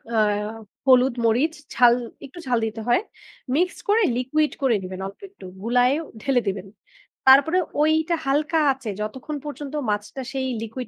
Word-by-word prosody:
আ - - +2 0.7
হলুদ, 255 0 +5
মরিচ, 255 +8 +2 0.2
ঝাল 240 0 +6 0.3
একটু 280 +6 -12
ঝাল 245 -2 +2
দিতে 220 0 -5
হয়। 240 +10 +3 0.5
মিক্স 360 +3 +1
করে 435 +1 +4
liquid 300 +5 +1
করে 260 -4 +3
নিবেন 185 +1 -6
অল্প 195 - -12
একটু। 385 - -14 0.2
গুলায়ে 245 +3 +3 0.3
ঢেলে 260 -3 +2
দিবেন। 195 0 -3 0.6
তারপরে 285 +7 +7 0.2
ওইটা 315 +2 +2
হালকা 295 +4 +1
আঁচে 260 -4 -5
যতক্ষণ 260 +7 -5
পর্যন্ত 290 -1 -7 0.2
মাছটা 210 +5 -3
সেই 265 -1 -2
liquid 230 +3 -6
260 Hz, 150 wpm, -23 LUFS, 230-300 Hz, 0.7 s, তারপরে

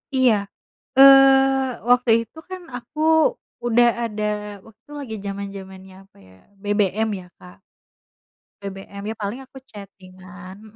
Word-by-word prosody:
Iya. 260 -3 +4 0.7
Eee, 270 -2 +6
waktu 245 -1 +3
itu 275 - -19
kan 370 -1 -8
aku 245 +5 -9 0.7
udah 240 0 +4 0.2
ada 210 -1 -5 0.4
waktu 225 +3 -21
lagi 255 -6 -7
zaman-zamannya 195 -1 -8
apa - - -31
ya, 95 - -19 0.3
BBM 205 +1 0
ya, 180 - -14
Kak. 180 0 -15 1.1
BBM, 200 0 -9
ya 225 - -5
paling 210 +4 -5
aku 265 0 -15
chating-an, 185 -2 -13
mmm, 215 0 -17
215 Hz, 125 wpm, -21 LUFS, 195-255 Hz, 1.1 s, Eee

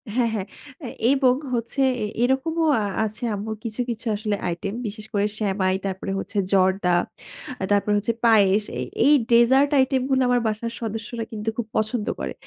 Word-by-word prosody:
হ্যাঁ, 245 -2 +2
হ্যাঁ, 200 -3 -3 0.4
এ - - -4 0.3
এবং 255 -2 +4 0.2
হচ্ছে 235 +3 -2 0.2
এ - - 0 0.2
এরকমও 320 +6 +1 0.4
আছে 215 +3 -6
আম্মুর 220 +2 -4
কিছু, 230 +1 -3
কিছু 235 +1 -5
আসলে 210 0 -2
আইটেম 175 +4 -3
বিশেষ 215 +1 -7
করে 205 0 +2
সেমাই, 190 -3 +1
তারপরে 190 0 -3
হচ্ছে 205 - -6 0.2
জর্দা, 185 -1 +3 0.7
আ - - -1
তারপরে 205 +1 +2
হচ্ছে 215 +3 0
পায়েস। 210 -2 +5 0.2
এ - - -1 0.2
এই 295 - +6 0.2
ডেজার্ট 260 +4 +5
আইটেম 260 0 +2
গুলো 265 -1 +2
আমার 245 -1 +3
বাসার 220 +2 -2
সদস্যরা 225 +1 -4
কিন্তু 215 0 -3
খুব 235 -2 -3
পছন্দ 215 0 -1
করে। 65 -1 -4
220 Hz, 170 wpm, -23 LUFS, 205-245 Hz, 0.7 s, এই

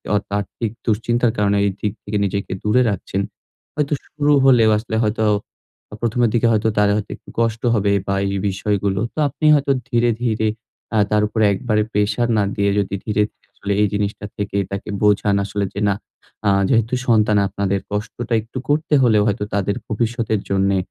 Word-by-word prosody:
অত 105 - 0
আর্থিক 105 +3 -4 0.2
দুশ্চিন্তার 120 +2 +1
কারণে 100 -1 +2
এই 100 - +1
দিক 105 - -1
থেকে 105 +1 -2
নিজেকে 100 +1 -3
দূরে 105 +4 +3
রাখছেন। 100 -1 -2 0.5
হয়তো 150 0 0
শুরু 150 -1 0
হলে 125 -4 +6
আসলে 110 +1 -4
হয়তো 110 +1 0 0.8
১ম 120 +1 -1
এর - - +2
দিকে 120 0 +3
হয়তো 110 0 +2
তারা 105 0 +4
হয়তো 105 -1 -3
একটু - - -18
কষ্ট 115 -1 0
হবে 100 -2 +2 0.2
বা 100 - +1
এই 100 0 -1
বিষয়গুলো। 100 0 -1
তো - - -37
আপনি 145 +3 -4
হয়তো 140 -1 +1 0.2
ধীরে, 120 -1 +2
ধীরে 110 -2 0 0.5
আ - - +3
তার 105 - +3
উপরে 110 0 +1
একবারে 105 +1 0
প্রেশার 105 +4 +1
না 105 - +3
দিয়ে 100 0 +1
যদি 100 -1 -1
ধীরে, 105 -1 +1
ধীরে - - -38
আসলে 100 - -5
এই 105 - +4
জিনিসটা 105 0 -2
থেকে 100 -1 -3
তাকে 100 +2 -5
বোঝান 105 -1 +3
আসলে 100 0 -2
যে 100 - -4
না 100 - +3 0.5
আ - - +5 0.2
যেহেতু 115 -1 +2
সন্তান 110 -3 +4
আপনাদের 100 0 -1
কষ্টটা 115 +3 -3
একটু 115 +4 -10
করতে 150 +1 +1
হলেও 110 -4 +4
হয়তো 105 0 0
তাদের 100 0 0
ভবিষ্যতের 115 0 -1
জন্যে 100 0 +2
105 Hz, 180 wpm, -20 LUFS, 100-115 Hz, 0.8 s, হলে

